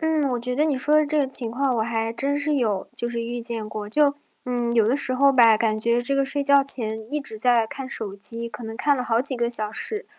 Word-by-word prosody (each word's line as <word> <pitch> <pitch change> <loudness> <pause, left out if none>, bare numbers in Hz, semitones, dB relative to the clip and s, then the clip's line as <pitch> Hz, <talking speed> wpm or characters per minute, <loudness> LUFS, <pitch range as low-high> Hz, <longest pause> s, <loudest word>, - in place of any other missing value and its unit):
嗯， 315 -3 0
我 245 - -2
觉 250 +1 -3
得 300 +3 +2
你 295 -4 0
说 295 +3 +2
的 305 0 +4
这 305 +1 -1
个 285 -2 +1
情 250 -3 +1
况 260 +1 0
我 - - +1
还 225 0 -2
真 275 +5 -2
是 290 +1 -1
有， 215 -8 -1
就 240 - -3
是 235 -1 -4
遇 240 +1 -4
见 230 -2 -5
过。 215 -1 -6
就， 285 +5 +2 0.3
嗯， 240 -1 -2
有 225 -3 +3
的 245 - +2
时 255 -2 +2
候 275 +2 +4
吧， 235 -4 +6
感 215 -1 0
觉 235 +2 +1
这 250 +3 +1
个 275 0 +1
睡 285 +1 +1
觉 280 0 +5
前 220 -5 -1
一 300 - -1
直 220 -5 -4
在 240 -1 +3
看 270 +1 -7
手 210 -6 -6
机， 230 +3 -2
可 230 +2 -10
能 225 0 -7
看 285 +4 +1
了 250 - -2
好 230 -1 +1
几 265 0 +1
个 235 0 0
小 215 -3 +1
时。 420 - -5
245 Hz, 295 characters per minute, -23 LUFS, 225-280 Hz, 0.3 s, 吧